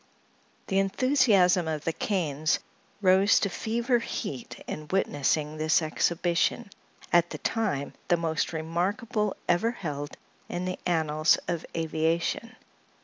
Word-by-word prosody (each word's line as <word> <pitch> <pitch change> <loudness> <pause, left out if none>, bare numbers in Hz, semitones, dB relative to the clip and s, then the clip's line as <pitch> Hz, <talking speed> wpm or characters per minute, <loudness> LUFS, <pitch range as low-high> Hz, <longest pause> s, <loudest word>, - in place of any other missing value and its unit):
The 195 - +1
enthusiasm 195 - +3
of 155 -2 -2
the 165 - -1
Kanes 155 -6 0 0.5
rose 190 +2 +5
to 200 - +1
fever 235 +5 0
heat 135 - -5
in 155 0 -6
witnessing 150 -4 0
this 155 +1 +3
exhibition, 170 +6 0 0.4
at 175 0 +5
the - - -5
time 195 -12 -1
the 175 - +3
most 160 -2 -1
remarkable 195 +7 -1
ever 175 +7 +3
held 145 -10 -5 0.3
in 175 +1 -3
the 185 0 -3
annals 155 -2 +3
of 170 -2 -3
aviation. 165 +8 -1
175 Hz, 120 wpm, -27 LUFS, 155-200 Hz, 0.5 s, rose